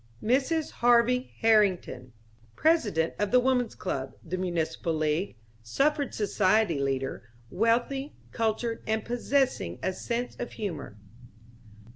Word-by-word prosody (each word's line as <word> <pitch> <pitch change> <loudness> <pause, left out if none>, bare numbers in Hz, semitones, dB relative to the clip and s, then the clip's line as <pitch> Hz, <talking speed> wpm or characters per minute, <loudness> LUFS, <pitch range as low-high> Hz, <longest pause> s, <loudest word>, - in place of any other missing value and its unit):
Mrs. 275 +7 +1
Harvey 245 +1 +3
Herrington.... 190 - +2 0.4
President 215 - +2
of 205 -1 +1
the 250 - +5
Woman's 250 -2 +1
Club, 135 -7 -4
the 175 +2 -4
Municipal 170 -2 -2
League, 155 - -1 0.2
Suffrage 280 - 0
Society 205 -4 +2
leader, 135 -3 -2 0.2
wealthy, 240 +7 0 0.2
cultured 225 0 -1
and 220 0 -1
possessing 245 - 0
a 185 - 0
sense 240 +5 -3
of 245 - -5
humor. 165 - -5
220 Hz, 110 wpm, -28 LUFS, 165-245 Hz, 0.4 s, the